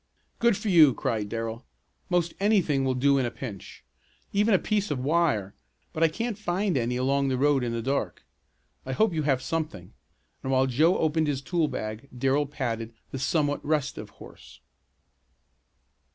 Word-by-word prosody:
"Good 235 -4 +3
for - - -5
you!" 155 -8 +7
cried 110 -3 -2
Darrell. 115 +2 -4 0.5
"Most 175 -2 +1
anything 190 -9 +2
will 130 -1 0
do 140 +2 +3
in 130 - +1
a - - -2
pinch. 110 -6 -9 0.5
Even 205 +1 +3
a - - +6
piece 210 +1 -1
of 145 - -1
wire, 135 - +1 0.4
but 155 - -4
I 165 - +6
can't 220 +6 -3
find 190 -1 0
any 125 -1 0
along 135 +2 +1
the 130 -1 0
road 140 -1 +3
in 120 - -1
the 115 -1 -3
dark. 135 +3 -2 0.6
I 130 - -4
hope 215 +6 +2
you 160 - 0
have 135 -3 +1
something," 155 - -4 0.5
and 135 - -3
while 130 0 +3
Joe 155 +8 +3
opened 160 0 +1
his 140 -2 -2
tool 170 +1 +1
bag 110 +2 -5
Darrell 135 +3 +1
patted 115 -5 -4 0.2
the 135 - -4
somewhat 145 +1 0
restive 150 -2 -2
horse. - - -15
140 Hz, 170 wpm, -27 LUFS, 125-165 Hz, 0.6 s, you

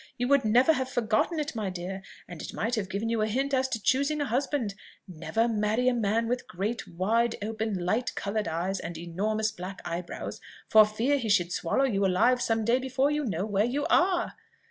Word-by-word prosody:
you 245 - 0
would 280 0 +4
never 245 +8 +5
have 260 -3 -2
forgotten 235 - 0
it, 295 - -3
my 210 -4 -2
dear, 185 +1 -5 0.3
and 175 -3 -8
it - - -7
might 230 +3 -2
have 210 -5 -1
given 200 +4 -2
you 225 -1 0
a 215 - +2
hint 270 +6 -1
as 265 0 +2
to 240 -3 -3
choosing 280 +7 +1
a 290 - 0
husband. 255 -3 -1 0.3
Never 205 +6 -1
marry 220 +2 +1
a 255 - +4
man 225 0 +1
with 245 +1 -2
great, 205 +6 -3
wide, 225 +7 +1
open, 220 0 -2
light 190 +7 -1
coloured 205 0 -2
eyes, 175 +4 -2
and 170 0 -6
enormous 210 +6 -1
black 185 +1 -7
eyebrows, 175 +1 -5 0.3
for 215 -1 +7
fear 240 +7 +1
he 230 -4 -3
should 180 -4 +3
swallow 225 +13 +1
you 200 -6 0
alive 230 +7 +3
some 225 -2 0
day 240 +3 +3
before 265 +2 +1
you 295 -1 -1
know 195 -4 -1
where 205 -1 +1
you 275 +5 -1
are. 355 0 +3
220 Hz, 210 wpm, -28 LUFS, 195-255 Hz, 0.3 s, for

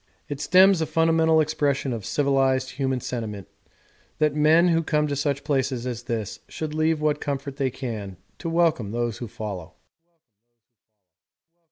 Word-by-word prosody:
It 145 0 -4
stems 185 0 +5
a 160 - 0
fundamental 160 0 +3
expression 145 -4 0
of 110 -4 -5
civilised 135 -2 +1
human 130 -1 -1
sentiment 105 -7 -5 0.7
that 150 -2 +2
men 155 +4 +4
who 165 -1 +3
come 150 -1 +1
to 145 -1 -2
such 140 0 -1
places 130 -4 -1
as 120 -2 -4
this 110 -5 -3
should 155 -1 -5
leave 155 0 +1
what 150 -1 +1
comfort 140 -1 -4
they 135 -2 +1
can 110 -7 -6 0.2
to 165 - -4
welcome 165 -10 +1
those 120 -1 -2
who 120 - -5
follow. 100 -6 -7
140 Hz, 150 wpm, -24 LUFS, 120-155 Hz, 0.7 s, stems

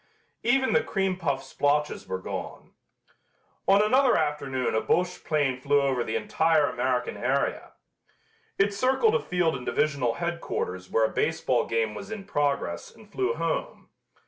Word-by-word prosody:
Even 260 +2 +2
the - - +4
cream 195 -3 0
puff 140 -7 -2
splotches 145 +2 0
were 95 0 -2
gone. 95 - -7 1.0
On 200 +2 +6
another 255 +4 +4
afternoon 145 -4 -1
a 110 - +2
Boche 180 +1 0
plane 140 -5 0
flew 145 +1 +3
over 135 -3 +1
the 110 - -3
entire 155 +6 +2
American 125 -1 -1
area. - - -1 0.8
It 200 +1 +2
circled 265 - +2
a 480 - +2
field 175 -3 0
in 125 - -6
divisional 140 -4 0
headquarters 170 - -3
where 115 - +3
a 110 - -3
baseball 145 -6 0
game 115 -1 0
was 200 - -8
in 220 -3 -6
progress 140 - -1
and 210 -2 -18
flew 390 - 0
home. - - -3
150 Hz, 150 wpm, -27 LUFS, 130-195 Hz, 1.0 s, On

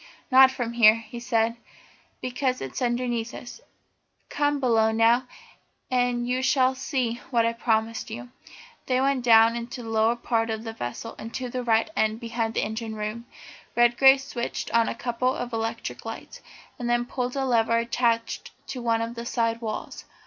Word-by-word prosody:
"Not 260 +1 +8
from 240 -3 -4
here," 220 -2 +7
he 230 +1 -8
said, 230 -1 0 0.6
"because 255 0 -1
it's 135 - -6
underneath 240 -1 -1
us. 250 - -10 0.7
Come 290 0 0
below 225 -4 +3
now, 230 +3 +3 0.6
and 245 -1 +1
you 250 +1 0
shall 260 -1 +3
see 255 -3 -2
what 235 -3 +2
I 230 - +1
promised 225 -1 -1
you." 120 +1 -7 0.6
They 255 -1 +2
went 270 -1 +1
down 225 -1 +6
into 235 +1 -6
the 225 - -7
lower 225 +1 +2
part 230 -1 -1
of 220 0 -3
the 225 -1 -6
vessel 120 - -6
and 225 - -7
to 255 -1 -3
the 255 - -4
after 225 +7 +3
end 220 +1 +1
behind 230 -1 -3
the - - +1
engine 220 0 -4
room. 215 +3 -5 0.5
Redgrave 255 +3 +6
switched 245 -3 -4
on 230 -1 +3
a - - -4
couple 245 +2 -1
of 245 -1 -5
electric 225 0 -4
lights, - - -8 0.4
and 240 -1 -3
then 240 0 +2
pulled 250 0 -3
a 270 -1 0
lever 230 -2 +2
attached 230 0 0 0.2
to 255 - -5
one 230 -1 +1
of 230 +1 -5
the 235 0 -6
side 230 -1 0
walls. 215 -2 -5
235 Hz, 175 wpm, -25 LUFS, 225-250 Hz, 0.7 s, Not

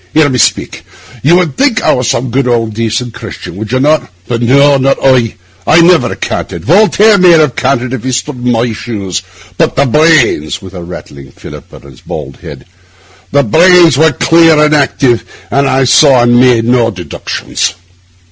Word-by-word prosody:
Hear 155 -2 +3
me 130 -2 -2
speak. - - -1 0.4
You 160 +6 +3
would 175 -5 -1
think 270 -4 0
I - - +2
was 125 -1 -2
some 120 +1 -2
good, 135 +1 -1
old, 115 -2 -1
decent 115 +2 -3
Christian, - - -9
would 110 +1 -7
you 130 - 0
not? 150 +3 0 0.2
But 120 -1 -3
no, 140 +4 +3
not 135 +1 0
I; 125 -4 +1 0.3
I 165 - +4
never 175 0 +2
canted. - - -5
Voltaire 210 +4 +3
might 175 -3 +5
have 150 -5 0
canted 130 -1 -2
if 130 - -5
he'd 130 0 -3
stood 130 +2 -4
in 125 - 0
my 115 0 -1
shoes; 100 -5 -5 0.4
but - - 0
the 140 - +1
brains'—with 125 - 0
a 90 - -8
rattling 70 -5 -11
fillip - - -13
on - - -14
his 70 -3 -16
bald 70 - -8
head—'the 95 +8 -7
brains 170 - +4
were 160 -1 +3
clear 165 -1 +3
and 150 0 +2
active, 135 -4 0 0.3
and 140 +2 +1
I 135 0 +1
saw 130 -1 +4
and 120 0 +3
made 125 -3 +2
no 120 -1 +1
deductions. 90 -5 -5
130 Hz, 180 wpm, -10 LUFS, 115-150 Hz, 0.4 s, might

